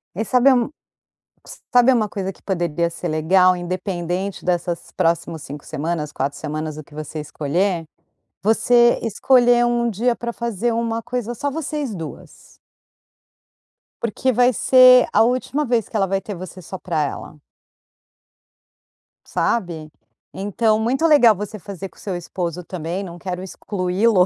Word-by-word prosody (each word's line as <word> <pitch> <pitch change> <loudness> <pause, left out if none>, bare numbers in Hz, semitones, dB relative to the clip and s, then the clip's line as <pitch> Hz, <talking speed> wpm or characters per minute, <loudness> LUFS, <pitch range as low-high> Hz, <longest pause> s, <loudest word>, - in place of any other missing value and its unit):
E 220 +5 -2
sabe 255 +4 +4
um 245 -2 +1 0.8
s - - -11
sabe 245 +1 +6
uma 220 -4 +1
coisa 195 -2 -4
que - - -24
poderia 170 -3 -1
ser 175 +1 -5
legal, 180 +4 +4
independente 180 +1 -3
dessas 175 -1 -2
próximos 165 -1 0
5 145 +1 -9
semanas, 155 0 -3
4 140 +2 -3
semanas, 155 0 -4
o 155 - -7
que 145 - -19
você 155 +1 -6
escolher? 165 +4 -1 0.6
Você 240 +3 +4
escolher 240 +2 +4
um 240 0 +1
dia 235 +4 +1
pra 235 0 -4
fazer 235 -1 -2
uma 230 0 -1
coisa 240 -1 -3
só 285 +5 -2
vocês 295 -4 -3
2. 165 -4 -10 1.4
Porque 235 +3 0
vai 245 +2 +4
ser 255 +1 +6
a 210 - +5
última 255 +5 0
vez 240 -5 0
que - - -13
ela 195 -2 +2
vai 195 +1 0
ter 205 +2 -7
você 185 +1 -9
só 185 +2 -8
para 160 -4 -1
ela. 150 +1 -6 1.8
Sabe? 170 -8 -2 0.4
Então, 215 +3 +1
muito 255 +8 +1
legal 280 -9 +6
você 210 +2 -6
fazer 195 +1 -7
com - - -26
seu 195 -3 -4
esposo 175 0 -4
também, 175 +2 -4
não 175 -2 -9
quero 180 0 -5
excluí-lo, 190 +1 +1
195 Hz, 150 wpm, -21 LUFS, 170-235 Hz, 1.8 s, sabe